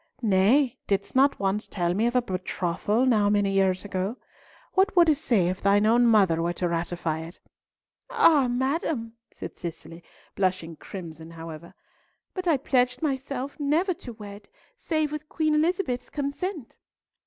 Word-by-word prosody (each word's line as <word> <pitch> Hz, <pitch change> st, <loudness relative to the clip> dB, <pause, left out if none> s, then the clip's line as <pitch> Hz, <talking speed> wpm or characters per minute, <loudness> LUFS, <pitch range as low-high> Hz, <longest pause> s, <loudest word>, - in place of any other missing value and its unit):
"Nay, 235 Hz, +7 st, +3 dB
didst 200 Hz, +3 st, -1 dB
not 275 Hz, +2 st, +4 dB
once 200 Hz, +2 st, -1 dB
tell 175 Hz, -2 st, -1 dB
me 215 Hz, +5 st, +1 dB
of 240 Hz, -, -2 dB
a 250 Hz, -, +3 dB
betrothal 185 Hz, +3 st, -1 dB
now 215 Hz, -5 st, +3 dB
many 205 Hz, -1 st, +2 dB
years 190 Hz, -1 st, +1 dB
ago? 195 Hz, +4 st, -3 dB, 0.6 s
What 385 Hz, +2 st, +2 dB
wouldst 330 Hz, -5 st, +4 dB
say 200 Hz, -8 st, +2 dB
if 185 Hz, +1 st, -3 dB
thine 200 Hz, +1 st, +3 dB
own 235 Hz, +2 st, +4 dB
mother 195 Hz, -7 st, +4 dB
were 170 Hz, +1 st, 0 dB
to 180 Hz, -, -2 dB
ratify 170 Hz, -1 st, -2 dB
it?" 165 Hz, +2 st, -9 dB, 0.7 s
"Ah! 290 Hz, -6 st, +4 dB
madam," 255 Hz, -1 st, -1 dB, 0.2 s
said -, -, -9 dB
Cicely, 170 Hz, 0 st, -8 dB, 0.3 s
blushing 185 Hz, -4 st, -1 dB
crimson 160 Hz, -2 st, -9 dB
however, 165 Hz, 0 st, -10 dB, 0.6 s
"but 370 Hz, -1 st, -4 dB
I 320 Hz, -4 st, +4 dB
pledged 250 Hz, 0 st, 0 dB
myself 275 Hz, 0 st, -3 dB
never 315 Hz, +6 st, +1 dB
to 250 Hz, -7 st, -10 dB
wed 205 Hz, -2 st, -11 dB, 0.3 s
save 310 Hz, -9 st, -1 dB
with 300 Hz, 0 st, -6 dB
Queen 310 Hz, -1 st, 0 dB
Elizabeth's 315 Hz, -4 st, 0 dB
consent." 290 Hz, -, -4 dB
225 Hz, 150 wpm, -26 LUFS, 185-280 Hz, 0.7 s, not